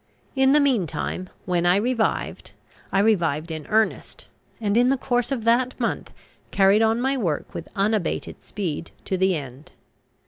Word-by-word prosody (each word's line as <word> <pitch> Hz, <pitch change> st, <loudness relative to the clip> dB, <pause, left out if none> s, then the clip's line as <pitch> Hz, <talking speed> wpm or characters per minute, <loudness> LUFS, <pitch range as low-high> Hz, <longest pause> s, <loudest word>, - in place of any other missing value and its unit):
In 265 Hz, 0 st, +4 dB
the 300 Hz, -, +6 dB
meantime, 200 Hz, -, -1 dB, 0.2 s
when 175 Hz, -2 st, 0 dB
I 175 Hz, -, +5 dB
revived, 230 Hz, +2 st, -1 dB, 0.4 s
I -, -, +1 dB
revived 170 Hz, -7 st, +1 dB
in 155 Hz, -2 st, -6 dB
earnest, 220 Hz, 0 st, -1 dB, 0.3 s
and 205 Hz, -2 st, 0 dB
in 245 Hz, +2 st, +4 dB
the 270 Hz, -, +2 dB
course 245 Hz, 0 st, -1 dB
of 250 Hz, -5 st, -2 dB
that 245 Hz, +3 st, +2 dB
month -, -, -2 dB, 0.4 s
carried 195 Hz, +2 st, +4 dB
on 225 Hz, +1 st, +3 dB
my 265 Hz, +2 st, +1 dB
work 175 Hz, -, -2 dB
with 165 Hz, -, -7 dB
unabated 205 Hz, -2 st, -1 dB
speed 170 Hz, -5 st, -4 dB, 0.2 s
to 190 Hz, -, -1 dB
the 190 Hz, 0 st, +2 dB
end. 135 Hz, -1 st, -8 dB
210 Hz, 160 wpm, -23 LUFS, 175-245 Hz, 0.4 s, the